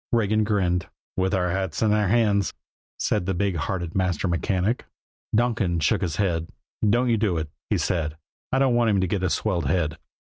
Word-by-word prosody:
Regan 110 Hz, -2 st, +2 dB
grinned. 90 Hz, -5 st, +1 dB, 0.3 s
"With 95 Hz, +1 st, +1 dB
our 90 Hz, -2 st, +1 dB
hats 95 Hz, 0 st, -1 dB
in 105 Hz, -1 st, +3 dB
our 105 Hz, -1 st, +2 dB
hands," 105 Hz, -2 st, +2 dB, 0.4 s
said 90 Hz, -, 0 dB
the 95 Hz, -, 0 dB
big 100 Hz, 0 st, 0 dB
hearted 85 Hz, +1 st, -2 dB
master 95 Hz, 0 st, 0 dB
mechanic. 95 Hz, +6 st, 0 dB, 0.5 s
Donkin 110 Hz, -7 st, +1 dB
shook 75 Hz, -, +2 dB
his 85 Hz, -5 st, -1 dB
head. 85 Hz, -5 st, 0 dB, 0.4 s
"Don't 120 Hz, +3 st, +3 dB
you 115 Hz, -, +3 dB
do 100 Hz, -5 st, +1 dB
it," 80 Hz, -2 st, -3 dB, 0.2 s
he -, -, +2 dB
said. 80 Hz, -3 st, -1 dB, 0.3 s
"I 130 Hz, -, +2 dB
don't 135 Hz, -2 st, +3 dB
want 120 Hz, -1 st, +3 dB
him 100 Hz, -2 st, +3 dB
to 95 Hz, -, +1 dB
get 95 Hz, +1 st, -1 dB
a 90 Hz, -, +1 dB
swelled 90 Hz, -6 st, 0 dB
head." 80 Hz, 0 st, 0 dB
95 Hz, 195 wpm, -25 LUFS, 85-105 Hz, 0.5 s, in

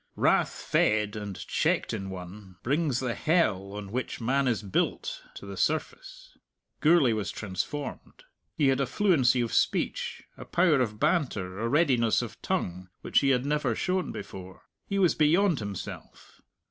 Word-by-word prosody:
Wrath -, -, +2 dB
fed 105 Hz, -1 st, +2 dB
and 105 Hz, -2 st, -5 dB
checked -, -, 0 dB
in 95 Hz, 0 st, -4 dB
one 95 Hz, +1 st, -9 dB
brings 140 Hz, -1 st, +1 dB
the 125 Hz, -2 st, -1 dB
hell 100 Hz, -, +1 dB
on 100 Hz, -1 st, -7 dB
which 130 Hz, +3 st, -3 dB
man 135 Hz, +3 st, +1 dB
is 115 Hz, -3 st, 0 dB
built 95 Hz, -, -1 dB
to -, -, -9 dB
the 100 Hz, 0 st, -7 dB
surface. -, -, -3 dB, 0.4 s
Gourlay 150 Hz, -5 st, +5 dB
was 105 Hz, -2 st, -2 dB
transformed. 105 Hz, +9 st, -5 dB, 0.3 s
He 145 Hz, -4 st, +4 dB
had 135 Hz, +1 st, +2 dB
a 135 Hz, -, 0 dB
fluency 135 Hz, -, +3 dB
of 115 Hz, -, -2 dB
speech, -, -, 0 dB
a -, -, -8 dB
power 170 Hz, -6 st, +3 dB
of 105 Hz, -3 st, -2 dB
banter, 125 Hz, -, 0 dB
a 115 Hz, +1 st, -1 dB
readiness 130 Hz, -7 st, +3 dB
of -, -, -9 dB
tongue, 90 Hz, +1 st, -2 dB
which -, -, +3 dB
he 140 Hz, -, +2 dB
had 130 Hz, -1 st, +2 dB
never 145 Hz, -5 st, 0 dB
shown 185 Hz, 0 st, -1 dB
before. 95 Hz, -2 st, -9 dB, 0.2 s
He 200 Hz, -, -2 dB
was 185 Hz, -4 st, +4 dB
beyond 165 Hz, +1 st, +3 dB
himself. 100 Hz, -3 st, -8 dB
125 Hz, 160 wpm, -28 LUFS, 100-150 Hz, 0.4 s, Gourlay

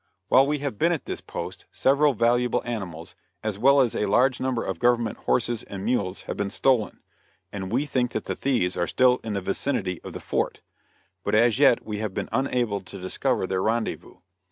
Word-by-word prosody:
While 135 Hz, +1 st, +6 dB
we 150 Hz, +1 st, +1 dB
have 140 Hz, -7 st, -4 dB
been 170 Hz, -, +3 dB
at 165 Hz, -, -2 dB
this -, -, -5 dB
post -, -, -7 dB
several 140 Hz, +1 st, +3 dB
valuable 120 Hz, +2 st, +2 dB
animals, 95 Hz, -9 st, -5 dB, 0.3 s
as 105 Hz, -2 st, -3 dB
well 140 Hz, +4 st, +6 dB
as 120 Hz, -4 st, +1 dB
a -, -, 0 dB
large 125 Hz, +5 st, +3 dB
number 130 Hz, -3 st, -1 dB
of 95 Hz, -3 st, -3 dB
government 120 Hz, -1 st, +2 dB
horses 120 Hz, -2 st, +1 dB
and 100 Hz, 0 st, -7 dB
mules 100 Hz, -6 st, -1 dB
have -, -, -5 dB
been 100 Hz, -1 st, -2 dB
stolen, 125 Hz, 0 st, +1 dB, 0.5 s
and 95 Hz, -2 st, -5 dB
we 130 Hz, +5 st, +1 dB
think 125 Hz, -4 st, -1 dB
that 110 Hz, -, -3 dB
the -, -, -3 dB
thieves 120 Hz, -10 st, 0 dB
are 85 Hz, -, 0 dB
still 125 Hz, -1 st, +3 dB
in 110 Hz, -, -4 dB
the 100 Hz, -, -2 dB
vicinity 95 Hz, -2 st, -2 dB
of -, -, -9 dB
the -, -, -6 dB
fort, -, -, -2 dB, 0.6 s
but -, -, 0 dB
as 115 Hz, +2 st, +4 dB
yet 140 Hz, -5 st, +5 dB
we 105 Hz, -1 st, -4 dB
have 105 Hz, -3 st, -4 dB
been -, -, -3 dB
unable 120 Hz, -6 st, 0 dB
to 100 Hz, +1 st, -10 dB
discover 95 Hz, 0 st, -1 dB
their 95 Hz, 0 st, -1 dB
rendezvous. 110 Hz, +2 st, -2 dB
115 Hz, 200 wpm, -25 LUFS, 100-130 Hz, 0.6 s, While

